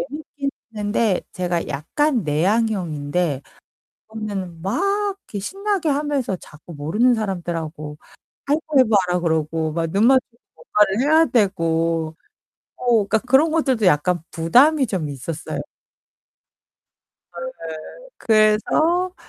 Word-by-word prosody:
재밌긴 290 Hz, -2 st, -5 dB, 0.3 s
했는데 205 Hz, -1 st, +1 dB
제가 175 Hz, -2 st, -2 dB
약간 240 Hz, -, 0 dB
내향형인데 170 Hz, -, 0 dB, 0.7 s
그거는 195 Hz, -6 st, -5 dB
막 195 Hz, -, -1 dB, 0.5 s
이렇게 205 Hz, -, -4 dB
신나게 390 Hz, -, -2 dB
하면서 285 Hz, -7 st, -1 dB
자꾸 165 Hz, 0 st, -13 dB
모르는 210 Hz, +13 st, +2 dB
사람들하고 165 Hz, -7 st, -4 dB, 0.5 s
하이파이브 290 Hz, -4 st, +2 dB, 0.2 s
하라 180 Hz, 0 st, 0 dB
그러고 160 Hz, -1 st, -1 dB
막 165 Hz, 0 st, -1 dB
눈만 235 Hz, +8 st, +5 dB
마주치면 235 Hz, 0 st, -35 dB
뭔가를 210 Hz, 0 st, +1 dB
해야 315 Hz, +4 st, +5 dB
되고 165 Hz, -6 st, 0 dB, 0.6 s
어, 250 Hz, -, -8 dB, 0.2 s
그러니까 220 Hz, +2 st, +1 dB
그런 265 Hz, +6 st, +3 dB
것들도 265 Hz, -9 st, +1 dB
약간 175 Hz, +1 st, +2 dB
부담이 260 Hz, -, +4 dB
좀 180 Hz, -9 st, -3 dB
있었어요. 145 Hz, +4 st, -5 dB, 1.8 s
네네. -, -, -4 dB, 0.7 s
그래서 275 Hz, +12 st, +2 dB
200 Hz, 270 characters per minute, -21 LUFS, 165-260 Hz, 1.8 s, 눈만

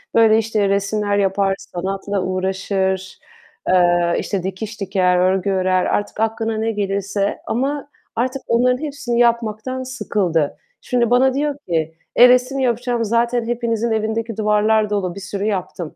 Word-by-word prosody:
Böyle, 225 Hz, -1 st, +6 dB
işte, 215 Hz, -2 st, +1 dB
resimler 205 Hz, +1 st, 0 dB
yapar, 195 Hz, 0 st, +1 dB
sanatla 195 Hz, +2 st, -4 dB
uğraşır, 190 Hz, 0 st, -2 dB, 0.5 s
eee, 175 Hz, -1 st, +3 dB
işte, 195 Hz, -4 st, -3 dB
dikiş 200 Hz, +3 st, -5 dB
diker, 180 Hz, -2 st, +2 dB
örgü 190 Hz, +2 st, +2 dB
örer, 185 Hz, -1 st, +1 dB
artık 205 Hz, +1 st, -2 dB
aklına 225 Hz, 0 st, -1 dB
ne 225 Hz, +1 st, 0 dB
gelirse 200 Hz, -1 st, -1 dB
ama 280 Hz, +4 st, -2 dB, 0.3 s
artık 255 Hz, +3 st, -1 dB
onların 250 Hz, +2 st, +3 dB
hepsini 275 Hz, -5 st, -2 dB
yapmaktan 235 Hz, +2 st, 0 dB
sıkıldı. 190 Hz, -, -1 dB, 0.2 s
Şimdi 240 Hz, -2 st, 0 dB
bana 255 Hz, +2 st, +4 dB
diyor 290 Hz, +1 st, -1 dB
ki 160 Hz, -1 st, -1 dB, 0.2 s
"E, 245 Hz, 0 st, +8 dB
resim 255 Hz, +2 st, +3 dB
yapacağım, 240 Hz, -1 st, 0 dB
zaten 235 Hz, +1 st, +1 dB
hepinizin 235 Hz, -1 st, -1 dB
evindeki 220 Hz, 0 st, -2 dB
duvarlar 215 Hz, 0 st, +2 dB
dolu, 195 Hz, -3 st, -2 dB
bir -, -, -7 dB
sürü 195 Hz, +1 st, -4 dB
yaptım." 180 Hz, -5 st, -3 dB
210 Hz, 140 wpm, -20 LUFS, 190-235 Hz, 0.5 s, E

